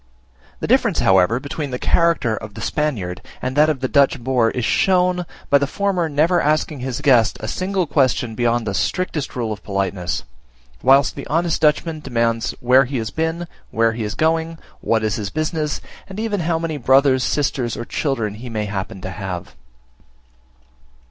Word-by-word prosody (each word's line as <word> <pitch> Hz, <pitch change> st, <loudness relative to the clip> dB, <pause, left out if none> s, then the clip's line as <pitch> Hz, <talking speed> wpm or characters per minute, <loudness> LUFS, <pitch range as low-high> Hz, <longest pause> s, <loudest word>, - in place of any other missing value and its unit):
The -, -, -1 dB
difference, -, -, +3 dB
however, 95 Hz, +5 st, +4 dB
between 145 Hz, +1 st, -5 dB
the 125 Hz, -, -3 dB
character 165 Hz, -7 st, +2 dB
of 110 Hz, -2 st, -9 dB
the -, -, -7 dB
Spaniard 100 Hz, -, -2 dB, 0.2 s
and 130 Hz, +1 st, -3 dB
that 150 Hz, +1 st, +5 dB
of 140 Hz, -4 st, -1 dB
the 130 Hz, -, 0 dB
Dutch 140 Hz, 0 st, +3 dB
boer 120 Hz, -2 st, +2 dB
is 125 Hz, -1 st, -2 dB
shown, 180 Hz, -2 st, +2 dB, 0.2 s
by 140 Hz, -, +6 dB
the 140 Hz, -, 0 dB
former 185 Hz, -1 st, 0 dB
never 160 Hz, +5 st, +2 dB
asking 150 Hz, -1 st, 0 dB
his 125 Hz, -1 st, -4 dB
guest 120 Hz, -6 st, +4 dB
a 110 Hz, -, -5 dB
single 185 Hz, -, -1 dB
question 130 Hz, -5 st, +1 dB
beyond 120 Hz, 0 st, 0 dB
the 100 Hz, -, -2 dB
strictest 150 Hz, -, -2 dB
rule 115 Hz, -3 st, -2 dB
of 105 Hz, -, -11 dB
politeness, 95 Hz, -6 st, -2 dB, 0.6 s
whilst 135 Hz, +2 st, +4 dB
the 140 Hz, -, -7 dB
honest 165 Hz, +2 st, 0 dB
Dutchman 155 Hz, +1 st, +2 dB
demands 115 Hz, -4 st, -1 dB
where 130 Hz, +2 st, +5 dB
he 130 Hz, +1 st, -3 dB
has 115 Hz, 0 st, -3 dB
been, 160 Hz, +2 st, -2 dB, 0.2 s
where 115 Hz, 0 st, +2 dB
he 115 Hz, 0 st, -4 dB
is 105 Hz, -, -4 dB
going, 160 Hz, +1 st, 0 dB, 0.2 s
what 110 Hz, -1 st, 0 dB
is 110 Hz, -2 st, 0 dB
his 105 Hz, -3 st, -3 dB
business, 155 Hz, 0 st, -2 dB, 0.3 s
and 195 Hz, +1 st, -8 dB
even 220 Hz, -2 st, -1 dB
how 165 Hz, -1 st, 0 dB
many 165 Hz, -2 st, -3 dB
brothers 130 Hz, 0 st, +4 dB
sisters, 130 Hz, -5 st, -1 dB
or 120 Hz, -, -5 dB
children 115 Hz, -9 st, -2 dB
he 120 Hz, +4 st, -8 dB
may 110 Hz, -2 st, -2 dB
happen 95 Hz, -2 st, -5 dB
to 95 Hz, -, -5 dB
have. 95 Hz, -3 st, -6 dB
135 Hz, 180 wpm, -20 LUFS, 115-155 Hz, 0.6 s, by